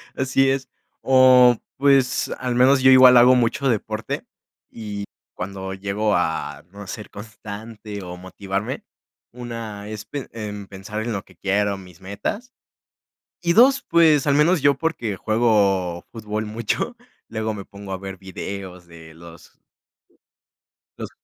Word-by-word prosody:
Así 135 +1 +2
es. 135 -1 -1 0.3
O 130 -2 +6 0.2
pues, 135 -2 +2
al 125 -1 -2
menos 130 +2 +5
yo 130 0 +6
igual 130 -1 +8
hago 125 +2 +7
mucho 125 +3 +1
deporte, 110 -1 -3 0.4
y 105 -3 -6 0.3
cuando 95 +1 -6
llego 100 +2 -1
a 85 -2 -2
no 100 -1 -10
ser 105 +2 -7
constante, 105 0 -9
o 90 0 -8
motivarme, 95 +2 -5 0.5
una 115 -4 -7
es 105 -1 -7
pe 140 -3 -6
em, 105 -3 -6
pensar 100 +3 -6
en 120 0 -3
lo 100 - -4
que 95 - -21
quiero 100 +1 0
mis 90 -2 -15
metas. 200 - -5 0.9
Y 170 0 +2
dos, 265 +5 +6
pues, 160 -4 +4
al 140 - +3
menos 155 +3 +3
yo, 140 -1 +5
porque 125 -9 -2
juego 100 -5 +1
fútbol 110 -1 -4
mucho, 115 - -3 0.3
luego 110 -1 -3
me 100 -2 -7
pongo 100 0 -10
a 95 - -3
ver 95 0 -8
videos 95 -1 -8
de 80 -1 -14
los 85 0 -15 1.4
los - - -6
110 Hz, 140 wpm, -22 LUFS, 100-130 Hz, 1.4 s, igual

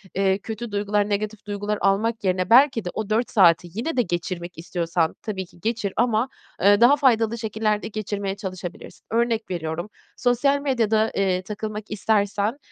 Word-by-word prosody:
eee, 190 0 +2
kötü 220 +2 -6
duygular, 205 0 0
negatif 210 +1 -3
duygular 205 +1 -2
almak 215 +3 +1
yerine 185 -1 0
belki 245 -3 +5
de - - -2
o 215 -2 -4
4 225 +3 +1
saati 175 -4 +5
yine 255 - -3
de - - +5
geçirmek 175 -2 -4
istiyorsan 170 -1 -1
tabii 195 -3 -4
ki 175 - -21
geçir 225 -2 -2
ama, 235 +1 +2 0.3
ııı, 205 +2 +5
daha 250 +4 +7
faydalı 235 -5 +2
şekillerde 215 -1 -1
geçirmeye 205 -2 -3
çalışabilirsin. 185 -3 -8
Örnek 230 -1 0
veriyorum, 170 +2 -3 0.3
sosyal 265 +3 +2
medyada, 225 -5 +1
eee, 190 -2 +1
takılmak 210 +2 -6
istersen, 210 +2 0
210 Hz, 155 wpm, -23 LUFS, 190-225 Hz, 0.3 s, daha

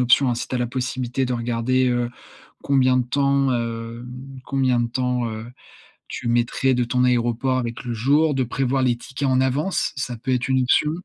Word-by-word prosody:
option, 125 +2 +4
hein, 120 - +1
si 120 +1 -4
tu - - -5
as - - 0
la 120 - 0
possibilité 130 0 -2
de 125 - -2
regarder, 120 +2 +1
heu, 120 -1 0 0.5
combien 130 -2 +3
de 125 - +1
temps, 140 0 +2
hem 115 0 -4 0.4
combien 130 -3 +1
de 120 0 0
temps, 125 0 -1
heu, 110 +1 -6 0.6
tu - - -5
mettrais 120 +3 +2
de 125 - +1
ton 125 +1 +1
aéroport 120 +1 +1
avec 120 -2 -4
le 120 - -2
jour. 145 +7 +2
De 130 - +1
prévoir 130 +2 0
les 125 -2 +2
tickets 140 +2 -4
en 130 0 +3
avance. 145 +9 0
Ça 125 -3 -4
peut 130 +2 -3
être 125 0 0
une 130 0 +3
option. 150 +4 +3
125 Hz, 200 wpm, -22 LUFS, 120-130 Hz, 0.6 s, option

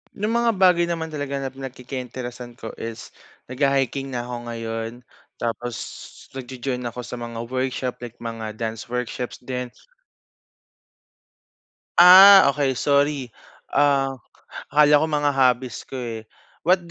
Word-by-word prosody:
Yung 210 +3 -2
mga 235 -1 +2
bagay 180 -2 +4
naman 160 -2 -3
talaga 145 -2 -4
na 135 - -4
pinagkaka 130 0 -7
interesan 125 -1 -8
ko 115 -2 -8
is 115 0 -7 0.4
nagha-hiking 135 0 0
na 120 - -2
ako 120 -1 -7
ngayon. 115 -1 -4 0.4
Tapos 120 0 -4 0.6
nagjo-join 130 0 -5
ako 125 +1 -6
sa 120 +2 -7
mga 115 -1 -6
workshop 130 +1 -3
like 120 -1 -9
mga 110 -2 -5
dance 115 0 -5
workshops 125 0 -4
din. 125 0 -4 2.3
Ah, 185 -2 +10
okey 140 -2 0
sorry. 140 -2 +1 0.4
Um, 135 -2 +2 0.5
akala 150 0 +5
ko 155 - +1
mga 145 -1 +1
hobbies 130 -2 +1
ko, 135 - -9
eh. 115 -3 -5 0.4
What 185 0 +4
130 Hz, 130 wpm, -23 LUFS, 120-145 Hz, 2.3 s, Ah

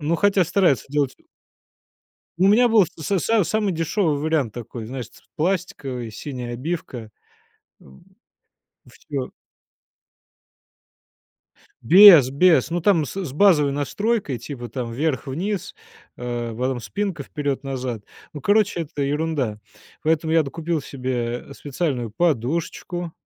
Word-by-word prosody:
Ну, 155 +3 0
хотя 200 0 +3
стараются 175 -6 +2
делать 140 -2 0
у - - -29 1.1
у 190 +2 +4
меня 240 +4 +5
был 220 -4 +5
с 165 0 -8
с 220 +1 +2
самый 210 +2 0
дешевый 165 -1 0
вариант 150 -7 -1
такой. 115 -1 -7
Знаешь 125 -1 -6
ц - - -21
пластиковый, 145 - -2
синяя 125 +1 -6
обивка, 125 -5 -5 0.7
м. 65 0 -18 0.9
Всё. 140 -3 -6 2.5
Без, 170 - +9
без. 165 +3 +4
Ну 175 - -1
там 170 -3 +3
с - - -8
с 135 - -6
базовой 150 -4 +4
настройкой. 150 - -1
Типа 120 0 -7
там 115 0 -5
вверх-вниз, 160 - -2 0.4
э, 120 -1 -4
потом 130 0 -1
спинка 195 - -3
вперед-назад. 135 -5 -4 0.3
Ну, 150 - -7
короче, 205 +1 +2
это 150 -3 -4
ерунда. 140 -6 -1 0.4
Поэтому 160 0 +1
я 165 0 +5
докупил 165 +3 -3
себе, 125 -3 -4
э, 140 - -9
специальную 135 -5 -3
подушечку, 165 - -2
150 Hz, 120 wpm, -22 LUFS, 125-175 Hz, 2.5 s, Без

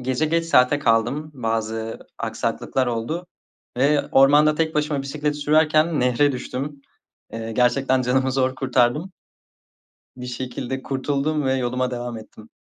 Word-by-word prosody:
gece 130 +4 0
geç 165 +1 +1
saate 145 -3 +4
kaldım. 125 +4 +1
Bazı 115 -2 -3 0.2
aksaklıklar 130 -1 -2
oldu 125 +10 -3 0.5
ve 145 +1 +2
ormanda 145 +3 +5
tek 160 0 -1
başıma 150 -2 0
bisiklet 150 +2 -2
sürerken 155 +1 +2
nehre 125 +3 +2
düştüm. 135 +3 -5 0.5
Eee, 115 0 -5
gerçekten 130 +2 +2
canımı 130 +1 +1
zor 130 0 +1
kurtardım. 130 +6 +1 1.0
Bir 125 0 -7
şekilde 125 +1 -5
kurtuldum 140 +3 -1
ve 130 0 +1
yoluma 125 0 -1
devam 120 -1 -5
ettim. 110 0 -14
130 Hz, 130 wpm, -22 LUFS, 125-150 Hz, 1.0 s, ormanda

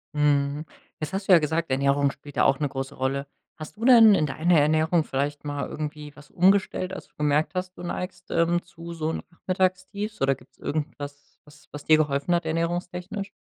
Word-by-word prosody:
Mhm. 145 0 +1 0.4
Jetzt 155 - -3
hast 195 +1 -3
du 190 - +6
ja 170 - +8
gesagt, 160 0 -1
Ernährung 140 +1 +2
spielt 145 +1 -12
da - - +4
auch 135 - +3
'ne 145 -2 0
große 135 0 -5
Rolle. 135 +2 -2 0.3
Hast 155 -1 -9
du 225 - -8
denn 230 -5 +8
in 155 - +2
deiner 160 +4 +2
Ernährung 155 +3 +3
vielleicht 145 +1 -3
mal 145 -1 -3
irgendwie 150 -1 -6
was 145 0 -16
umgestellt, 190 0 +2
als - - -8
du - - -40
gemerkt 150 +2 +1
hast, 185 0 -4
du 175 - -9
neigst, 180 +1 -6
ähm, 170 +1 +2
zu 170 0 -10
so 160 -1 -2
'nem - - -5
Nachmittagstief? 185 +3 -2
Oder 135 0 +3
gibt's 125 0 -22
irgendwas, 145 -1 -6
was 150 0 -19
was 145 - -7
dir 155 0 +6
geholfen 145 +2 0
hat 170 -1 +1
ernährungstechnisch? 175 +4 -3
155 Hz, 195 wpm, -25 LUFS, 145-180 Hz, 0.4 s, ja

